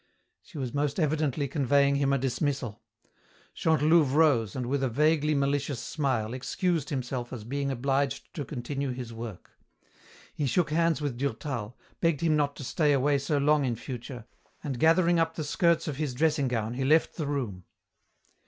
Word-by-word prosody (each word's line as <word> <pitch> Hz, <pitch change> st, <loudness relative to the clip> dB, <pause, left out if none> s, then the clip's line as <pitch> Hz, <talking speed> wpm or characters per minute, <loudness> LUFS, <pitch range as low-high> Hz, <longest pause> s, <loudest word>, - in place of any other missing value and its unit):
She 190 Hz, -, -13 dB
was 130 Hz, -4 st, -3 dB
most 145 Hz, +2 st, -1 dB
evidently 150 Hz, -3 st, 0 dB
conveying 140 Hz, 0 st, +2 dB
him 140 Hz, -1 st, +1 dB
a 140 Hz, -, +3 dB
dismissal. 135 Hz, -3 st, -2 dB, 0.7 s
Chantelouve 155 Hz, -2 st, +3 dB
rose 135 Hz, -10 st, +3 dB
and, 125 Hz, -, -2 dB
with 135 Hz, +3 st, -1 dB
a 135 Hz, -, +1 dB
vaguely 150 Hz, +4 st, +2 dB
malicious 140 Hz, -1 st, 0 dB
smile, 125 Hz, -7 st, -1 dB
excused 160 Hz, +4 st, -1 dB
himself 125 Hz, -2 st, -3 dB
as 120 Hz, -4 st, -6 dB
being 140 Hz, +4 st, -2 dB
obliged 135 Hz, +1 st, -1 dB
to 145 Hz, -, -4 dB
continue 140 Hz, +1 st, -4 dB
his 125 Hz, -2 st, -7 dB
work. 115 Hz, -5 st, -8 dB, 0.8 s
He 145 Hz, -, -1 dB
shook 155 Hz, +4 st, +1 dB
hands 165 Hz, 0 st, +2 dB
with 140 Hz, -5 st, -2 dB
Durtal, 125 Hz, -3 st, -3 dB, 0.2 s
begged 165 Hz, -4 st, +1 dB
him 160 Hz, -2 st, +3 dB
not 145 Hz, -1 st, +1 dB
to -, -, -8 dB
stay 150 Hz, +3 st, +2 dB
away 140 Hz, +1 st, +2 dB
so 140 Hz, +2 st, 0 dB
long 145 Hz, +1 st, +3 dB
in 125 Hz, -3 st, 0 dB
future, 120 Hz, 0 st, -7 dB, 0.4 s
and 135 Hz, -5 st, -4 dB
gathering 170 Hz, +2 st, +4 dB
up 165 Hz, 0 st, 0 dB
the 155 Hz, -, -3 dB
skirts 170 Hz, +3 st, +1 dB
of 145 Hz, -3 st, -3 dB
his 145 Hz, -5 st, -2 dB
dressing 150 Hz, -1 st, +2 dB
gown 115 Hz, -2 st, -2 dB
he 130 Hz, +2 st, -2 dB
left 155 Hz, +4 st, +3 dB
the 155 Hz, -4 st, -2 dB
room. 115 Hz, -11 st, -3 dB
140 Hz, 170 wpm, -28 LUFS, 125-150 Hz, 0.8 s, gathering